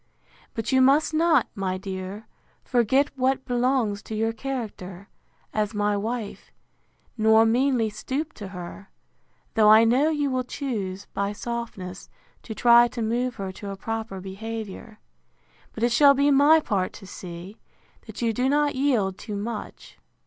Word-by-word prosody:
But 225 +2 -3
you 260 0 +4
must 280 +4 +4
not, 315 -4 +3
my 190 -2 -2
dear, 190 +2 -6 0.4
forget 260 +4 +2
what 265 0 0
belongs 245 -4 0
to 220 - -7
your 225 +1 0
character, 215 -7 -6 0.4
as 210 0 -1
my 205 0 +1
wife, 220 +1 -4 0.7
nor 220 +1 +5
meanly 240 -1 +2
stoop 280 +9 -4
to 205 - -8
her; 185 +1 -9 0.6
though 215 -1 +5
I 220 +1 +8
know 255 +7 +3
you 290 -3 0
will 255 0 0
choose, 205 -8 -4
by 200 +1 -1
softness, 210 -5 -6 0.3
to 220 - -8
try 240 +1 +6
to 235 -1 -5
move 245 +2 -1
her 195 -1 -5
to 200 +2 -8
a 195 - -5
proper 220 -2 -4
behaviour. 215 +2 -7 0.7
But 225 - -6
it 240 - +3
shall 280 +3 +6
be 285 +1 +3
my 290 +3 +6
part 190 -8 -1
to - - -12
see, 180 +2 -9 0.5
that - - -7
you 230 -1 +1
do 250 +4 0
not 290 0 +2
yield 235 -9 0
too 210 - -6
much. 210 +1 -7
225 Hz, 155 wpm, -25 LUFS, 200-260 Hz, 0.7 s, I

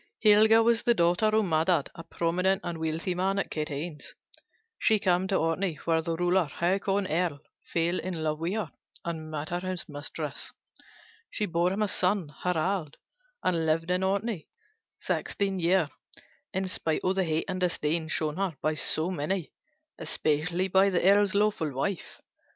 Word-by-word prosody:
Helga 220 +1 +6
was 230 0 +3
the 240 - +3
daughter 175 +3 +3
of 215 0 +3
Maddad, 160 -2 +2
a 170 - -9
prominent 180 +4 0
and 170 -2 -4
wealthy 160 +3 -1
man 190 +2 0
at 195 - -2
Katanes. 150 +1 -5 0.6
She 220 - +4
came 185 -2 +1
to 195 - 0
Orkney, 165 +1 0
where 165 -1 +2
the 165 0 -2
ruler, 175 +1 +2
Haakon 195 +5 0
Earl, 165 -3 0 0.3
fell 170 +2 +1
in 175 -4 -4
love 155 -1 -1
with 170 +3 -1
her 210 -9 -3 0.3
and 160 -2 -4
made 155 0 -4
her 175 - -1
his 185 -1 -4
mistress. 145 -1 -6 0.8
She 210 - -1
bore 175 0 +1
him 205 +3 0
a - - +1
son, 180 -5 0
Harald, 180 -2 -1 0.5
and 165 -3 +1
lived 165 +2 +1
at 180 +1 +1
Orkney 195 -2 -1 0.5
sixteen 195 -2 -1
years 170 -2 +2 0.6
in 190 0 -1
spite 160 -3 0
of 185 - +2
the 190 0 +1
hate 160 -2 0
and 185 -1 -3
disdain 165 -2 0
showed 155 +1 -2
her 190 -6 -1
by 155 +1 0
so 155 +2 +1
many, 175 +1 -2 0.5
especially 160 +3 0
by 190 +1 +4
the 180 -1 +2
Earl's 200 0 +5
lawful 205 -7 +1
wife. 160 +7 -3
175 Hz, 165 wpm, -28 LUFS, 160-195 Hz, 0.8 s, Helga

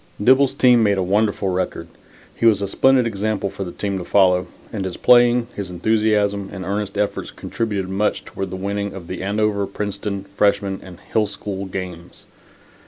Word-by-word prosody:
Dibble's 130 +5 +4
team 125 -2 +5
made 100 -2 +3
a 95 - +1
wonderful 100 +1 +1
record. 95 0 -2 0.5
He 115 - +2
was 105 -3 +5
a - - -1
splendid 130 +5 +3
example 105 -2 -2
for 100 0 -5
the 90 - -6
team 100 0 -3
to - - -5
follow, 90 -1 +3 0.3
and 100 -3 -2
his 95 -2 -4
playing, 120 -1 +5
his 100 -3 -5
enthusiasm, 105 +1 +1
and 95 -2 -6
earnest 100 +1 -3
efforts 105 0 -1
contributed 105 -5 -3
much 100 +3 -1
toward 95 -1 -5
the 95 - -5
winning 100 +1 -3
of 95 -3 -8
the 90 +1 -6
Andover, 100 0 0
Princeton 100 0 -4
freshmen 100 0 0
and 90 -2 -12
Hill 110 -1 +2
School 100 -1 -5
games. 90 -2 -7
100 Hz, 175 wpm, -21 LUFS, 95-105 Hz, 0.5 s, team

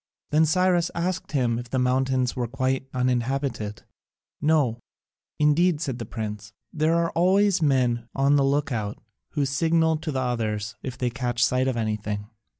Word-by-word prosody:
Then 155 +2 +4
Cyrus 180 +1 +2
asked 175 0 -2
him 120 -4 +1
if 120 0 -8
the 130 - -1
mountains 130 0 +1
were 125 -2 -1
quite 130 +1 -1
uninhabited. 125 -3 -1 0.6
"No, 145 -7 +2 0.6
indeed," 150 +2 +3
said 135 -6 -3
the 115 - -5
prince, 110 -1 -6 0.2
"there 160 +1 +2
are 170 0 +1
always 190 +2 +3
men 125 -5 +2
on 140 +1 +3
the 140 - +4
look 145 +2 +1
out, 105 -4 -3 0.4
who 145 -2 +1
signal 160 +3 +2
to 160 0 -4
the 135 - -1
others 110 -4 -2
if 130 -1 -6
they 125 -2 -1
catch 120 -1 0
sight 130 +1 +1
of 130 -2 -1
anything." 105 -2 -2
130 Hz, 160 wpm, -25 LUFS, 120-155 Hz, 0.6 s, Then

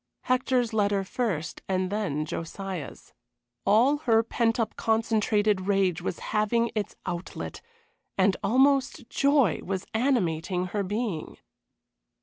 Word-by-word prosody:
Hector's 250 -2 +1
letter 205 -2 +2
first 190 -6 -3
and 185 0 0
then 190 -8 -1
Josiah's. 175 +1 -6 0.5
All 240 +8 +5
her 230 -6 +3
pent 230 0 0
up, 225 - -1
concentrated 215 -3 +1
rage 195 -4 +2
was - - -3 0.2
having 230 +2 +2
its 210 -3 -3
outlet, 175 -1 -5 0.6
and 190 0 +4
almost 265 0 +2
joy 275 - +3
was 190 0 -3
animating 185 - 0
her 205 - 0
being. 205 -3 -3
210 Hz, 115 wpm, -27 LUFS, 185-235 Hz, 0.6 s, All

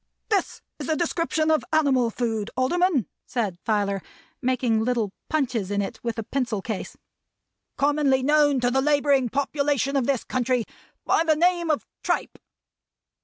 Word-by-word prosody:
"This 400 -4 -1 0.2
is 290 - -5
a 315 - +2
description 325 -1 0
of 310 - +2
animal 275 -6 +3
food, 225 -2 -2
Alderman," 325 - +2 0.2
said 205 -8 -2
Filer, 200 -3 0 0.4
making 245 -3 +1
little 230 -4 0 0.2
punches 255 -10 0
in 205 0 0
it 200 - -3
with 235 -1 -3
a 225 - -2
pencil 235 -3 -2
case, 210 0 -5 0.8
"commonly 280 -2 +2
known 295 -1 +4
to 245 0 +2
the 265 +1 +2
laboring 285 -3 +3
population 280 0 0
of 265 -3 +1
this 275 -4 +1
country 250 -2 0 0.4
by - - +3
the 315 -2 +3
name 345 +1 +2
of 305 - 0 0.2
tripe." - - -2
265 Hz, 150 wpm, -25 LUFS, 230-300 Hz, 0.8 s, known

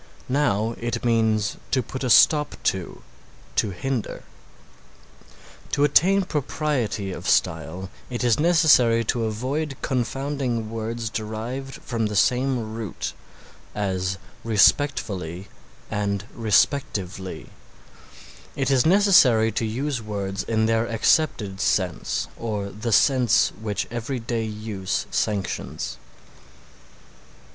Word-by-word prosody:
Now 115 -5 +1
it 120 0 -3
means 110 -3 +1
to 130 -2 +1
put 130 +4 -6
a 130 - 0
stop 150 +5 +5
to, 95 -3 -2 0.5
to 105 - +2
hinder. 120 +5 -4 1.5
To 140 - +2
attain 190 +7 +4
propriety 130 - -2
of 90 0 -4
style 90 +2 0 0.2
it 120 -1 -3
is 120 0 +3
necessary 150 -9 +5
to 115 +1 -1
avoid 135 +6 -3
confounding 130 -3 -2
words 115 0 -4
derived 115 +5 -5
from 115 -3 -1
the 105 - -5
same 125 0 +1
root; 110 -4 -5 0.6
as 95 -2 -1 0.3
respectfully 100 - +1 0.4
and 100 -1 -1
respectively; 100 -4 0 1.1
it 135 -1 0
is 130 +1 +4
necessary 165 - +5
to 115 - -1
use 130 +3 -2
words 100 -2 -3
in 110 -1 0
their 115 +1 +1
accepted 110 -4 +1
sense 100 -3 0
or 105 -3 -3
the 115 +3 -4
sense 125 0 +4
which 105 -2 -2
everyday 120 -1 -3
use 105 -3 -3
sanctions. 100 -3 -2
115 Hz, 105 wpm, -24 LUFS, 105-130 Hz, 1.5 s, stop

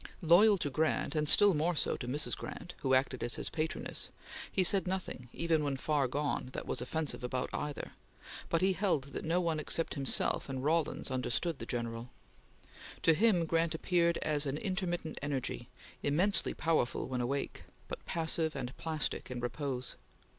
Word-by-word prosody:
Loyal 195 +6 +7
to 145 -5 -2
Grant, 155 +5 +1
and 150 -2 +1
still 205 +3 +7
more 165 +3 +1
so - - +1
to 125 - -6
Mrs. 145 +4 -1
Grant, 180 - -7
who 130 -1 +2
acted 130 -1 +1
as 120 - +2
his - - -2
patroness, 160 0 -3 0.4
he 190 - +2
said 190 +1 +5
nothing, 180 -9 -4
even 165 -2 +1
when 140 -2 -1
far 145 -1 +1
gone, 140 -1 -2
that - - -5
was - - -1
offensive 150 +2 -2
about 125 +1 -2
either, 150 -1 -4 0.6
but 165 - +2
he 190 +1 +4
held 165 -8 0
that - - -4
no 165 +2 +1
one 165 -3 0
except 165 +2 -1
himself 140 0 +1
and 130 -1 -3
Rawlins 155 -2 +1
understood 130 +5 -1
the - - -6
General. 115 -1 -3 0.9
To 165 - +6
him, 185 -1 +3
Grant 165 0 +1
appeared 170 0 +2
as 150 -1 +1
an 135 +2 -1
intermittent 180 -4 -2
energy, 140 -3 -3 0.3
immensely 175 +7 +3
powerful 160 -7 0
when 125 -1 -2
awake, 135 +3 -3 0.2
but - - -6
passive 160 -1 0
and 125 -1 -4
plastic 155 -3 -3
in 125 -1 -4
repose. 125 +1 -3
155 Hz, 170 wpm, -33 LUFS, 135-170 Hz, 0.9 s, Loyal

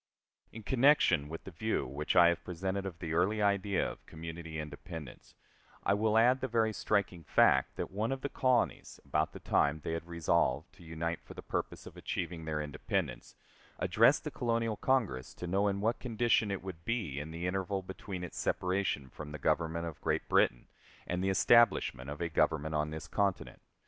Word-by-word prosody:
In 110 - -9
connection 130 - +4
with 80 - -7
the 95 - -9
view 110 +7 -1
which 70 +6 -2
I 85 -2 +8
have 85 - -1
presented 95 +2 -3
of 90 -4 -7
the 80 -2 -4
early 95 +6 +2
idea 100 -1 +1
of - - -8
community 80 0 -7
independence, 75 0 -8 0.5
I - - +3
will 110 +1 +2
add 125 +3 +5
the 130 - 0
very 110 -2 +1
striking 100 -5 0
fact 65 -2 +3
that - - -4
one 105 +5 -1
of 135 0 -3
the - - -1
colonies, 130 -3 0
about - - 0
the - - -9
time 75 +2 +2
they - - -3
had 80 +1 -4
resolved 85 -1 0
to 100 -3 -16
unite 85 +1 -3
for - - -12
the - - -8
purpose - - -4
of - - -11
achieving 85 -2 -4
their 75 -1 -2
independence, 75 0 -3 0.4
addressed - - +4
the - - -4
Colonial 115 -2 0
Congress 105 - 0
to - - -6
know 95 +4 +1
in 100 0 -1
what 115 +3 +1
condition 115 -3 +1
it 100 -2 -3
would 90 -4 -7
be 100 - -2
in 75 +2 -6
the 85 +2 -5
interval 95 +1 -1
between 95 0 -6
its 90 - -6
separation 90 -7 0
from 75 +3 -9
the 75 - -5
Government 85 +3 0
of 80 -3 -7
Great - - -1
Britain - - +2 0.4
and 90 +1 -2
the 95 - +1
establishment 95 - +4
of 75 +2 -6
a 85 - 0
government 80 -1 +1
on 75 0 0
this 80 0 -6
continent. 100 -2 -1
90 Hz, 190 wpm, -32 LUFS, 80-105 Hz, 0.5 s, I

